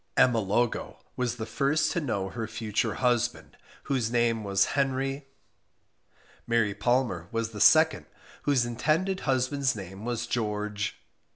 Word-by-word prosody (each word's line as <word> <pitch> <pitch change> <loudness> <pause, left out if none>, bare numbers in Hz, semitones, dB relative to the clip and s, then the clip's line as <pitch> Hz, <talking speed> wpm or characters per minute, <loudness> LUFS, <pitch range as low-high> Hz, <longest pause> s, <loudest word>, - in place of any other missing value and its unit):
Emma 120 -3 +5
Logo 110 +4 -1 0.2
was 125 -1 -1
the 110 -2 -5
first 150 +5 +1
to 170 - -1
know 100 -9 -2
her 115 +2 -4
future 110 0 -2
husband, 120 -1 0 0.3
whose 130 -5 0
name 120 -2 +1
was 100 -1 +1
Henry. 135 0 -1 1.2
Mary 115 -3 +2
Palmer 105 -5 0
was 115 0 -2
the 105 -2 -6
second, 160 +5 +5 0.3
whose 135 -5 +2
intended 155 +11 0
husband's 130 0 0
name 95 0 -8
was 120 0 -2
George 105 -2 -2
120 Hz, 130 wpm, -28 LUFS, 110-135 Hz, 1.2 s, Emma